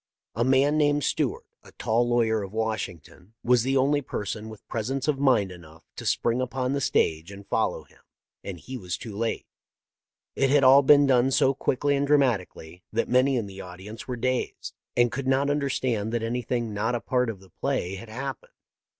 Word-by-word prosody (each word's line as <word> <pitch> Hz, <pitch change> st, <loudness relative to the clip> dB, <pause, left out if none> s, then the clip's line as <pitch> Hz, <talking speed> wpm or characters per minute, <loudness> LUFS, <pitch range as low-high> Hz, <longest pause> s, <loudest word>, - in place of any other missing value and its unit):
A 115 Hz, -, 0 dB
man 135 Hz, +4 st, +3 dB
named 145 Hz, -1 st, +2 dB
Stewart, -, -, -1 dB, 0.2 s
a -, -, -18 dB
tall 120 Hz, +1 st, 0 dB
lawyer 115 Hz, -2 st, +2 dB
of 95 Hz, -1 st, -6 dB
Washington, 110 Hz, -3 st, -5 dB
was 125 Hz, -1 st, +4 dB
the 135 Hz, +3 st, +1 dB
only 145 Hz, +2 st, +2 dB
person 110 Hz, -3 st, -5 dB
with 110 Hz, -2 st, -13 dB
presence 130 Hz, +5 st, -3 dB
of 145 Hz, -3 st, +1 dB
mind 120 Hz, -9 st, +3 dB
enough 80 Hz, -2 st, -14 dB
to -, -, -6 dB
spring 120 Hz, +2 st, +1 dB
upon 130 Hz, +1 st, -2 dB
the 140 Hz, -, -1 dB
stage 80 Hz, -7 st, 0 dB
and 100 Hz, 0 st, -11 dB
follow -, -, 0 dB
him, -, -, -24 dB, 0.4 s
and 95 Hz, -3 st, -6 dB
he 130 Hz, +7 st, -7 dB
was 90 Hz, -4 st, -4 dB
too 110 Hz, -4 st, -8 dB
late. 115 Hz, +2 st, -2 dB, 0.5 s
" -, -, -67 dB
It 135 Hz, -, +2 dB
had 140 Hz, 0 st, +4 dB
all 135 Hz, +2 st, +8 dB
been 145 Hz, +1 st, +6 dB
done 130 Hz, -1 st, +3 dB
so 135 Hz, 0 st, +3 dB
quickly 140 Hz, +2 st, 0 dB
and 140 Hz, +1 st, 0 dB
dramati 130 Hz, -, +3 dB
cally 80 Hz, +3 st, -13 dB
that -, -, -1 dB
many 130 Hz, +2 st, +3 dB
in 115 Hz, -, -1 dB
the 95 Hz, -1 st, -9 dB
audience 95 Hz, +5 st, -10 dB
were 125 Hz, -, -3 dB
dazed, 130 Hz, +1 st, -2 dB, 0.2 s
and 120 Hz, -1 st, +4 dB
could 135 Hz, -1 st, -4 dB
not 135 Hz, +2 st, +2 dB
understand 130 Hz, -6 st, -1 dB
that 120 Hz, -1 st, -1 dB
anything 120 Hz, -1 st, -2 dB
not 110 Hz, +4 st, -1 dB
a -, -, -1 dB
part 125 Hz, +3 st, 0 dB
of 105 Hz, -4 st, -6 dB
the 95 Hz, -1 st, -19 dB
play 90 Hz, +2 st, -2 dB
had 95 Hz, +4 st, -8 dB
happened. 135 Hz, +3 st, -6 dB
120 Hz, 200 wpm, -26 LUFS, 105-135 Hz, 0.5 s, all